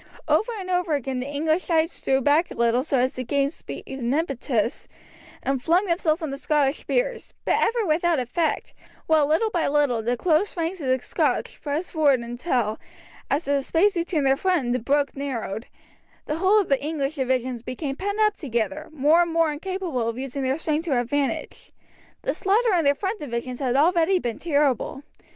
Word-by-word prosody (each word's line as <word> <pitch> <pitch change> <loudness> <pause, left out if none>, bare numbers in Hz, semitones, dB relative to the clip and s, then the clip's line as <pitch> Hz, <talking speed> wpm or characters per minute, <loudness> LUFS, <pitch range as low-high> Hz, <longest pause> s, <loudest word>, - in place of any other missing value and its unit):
Over 460 +3 +2
and 375 - -6
over 360 -4 +1
again 265 -2 -3
the 255 - -4
English 310 +4 0
knights 325 0 +1
drew 265 0 +2
back 295 +6 +3
a - - -8
little 235 +2 +2
so 280 -2 0
as 255 +1 +1
to 255 - -4
gain 280 +3 0
speed - - -8
and 260 -3 -3
impetus, 260 -7 -1 0.6
and 270 -1 0
flung 350 +8 +3
themselves 335 -2 0
on 305 - -3
the 275 - -5
Scottish 290 -2 +1
spears, - - -2
but - - +2
ever 460 -1 +1
without 335 0 +2
effect, 275 +6 -1 0.3
while 310 -2 +3
little 430 +9 +2
by 345 -4 0
little 280 -5 +2
the 240 +2 -1
close 350 - +1
ranks 335 +2 -2
of 275 - -3
the 255 0 +3
Scotch - - -1
pressed 305 +4 -3
forward 285 -6 +3
until, 240 -2 -1 0.5
as 290 +4 +1
the 280 0 +1
space 355 +9 +2
between 340 -3 -1
their 270 0 +4
front 360 -1 +1
and 240 - 0
the 250 - 0
brook 280 +4 0
narrowed, 240 -6 -4 0.6
the 300 - -2
whole 385 +5 +4
of 390 - -6
the 275 -1 +2
English 295 -2 -2
divisions 255 -3 -1
became 270 +3 -4
pent 405 +6 -3
up 425 -1 +3
together, 285 +1 -3
more 310 +3 +4
and 340 -1 0
more 330 -1 +2
incapable 330 -7 -3
of 230 - -5
using 270 +1 -4
their 265 +1 0
strength 315 0 -1
to 275 -7 +1
advantage. 275 +3 -2 0.5
The - - 0
slaughter 430 +3 +2
in 335 -4 +2
their 280 0 +4
front 395 +6 -3
divisions 250 -2 -4
had 260 -3 0
already 340 +5 +4
been 240 -9 -3
terrible. 285 -3 0
290 Hz, 195 wpm, -24 LUFS, 260-340 Hz, 0.6 s, their